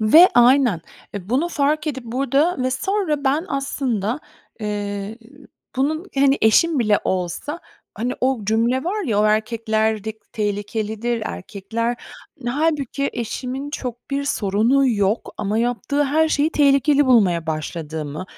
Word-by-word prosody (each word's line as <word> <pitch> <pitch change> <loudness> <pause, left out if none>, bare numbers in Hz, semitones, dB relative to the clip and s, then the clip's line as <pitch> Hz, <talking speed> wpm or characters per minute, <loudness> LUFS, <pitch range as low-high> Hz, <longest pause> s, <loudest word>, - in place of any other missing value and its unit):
Ve 310 +12 +8
aynen! 245 - +5 0.3
E, 195 -1 -6
bunu 280 +8 +1
fark 300 0 0
edip 265 -4 -3
burada 275 +8 +1
ve 255 - 0
sonra 310 0 -1
ben 285 +5 +1
aslında, 265 -3 -2 0.4
eee, 210 - -3
e 205 +1 -4
ü 285 +2 -17 0.3
bunun, 310 +7 0
hani, 275 0 +3
eşim 295 +8 +4
bile 215 -4 +3
olsa. 185 - -2 0.4
Hani 245 +3 -1
o 255 -4 0
cümle 230 +6 +1
var 410 +3 -2
ya, 215 -8 +1
o - - +3
erkekler 220 0 0
dik 220 0 -8
tehlikelidir, 215 +2 -2
erkekler 225 +6 -4 0.4
Hani, 240 - -3
hâlbuki 285 -2 0
eşimin 255 +4 -4
çok 250 -4 -6
bir 280 0 -1
sorunu 235 +3 +2
yok 205 -2 0
ama 210 +1 -1
yaptığı 245 +5 0
her 315 +3 +2
şeyi 300 0 +1
tehlikeli 285 -1 +3
bulmaya 185 -10 +3
başladığımı 155 0 -4
245 Hz, 140 wpm, -21 LUFS, 215-280 Hz, 0.4 s, Ve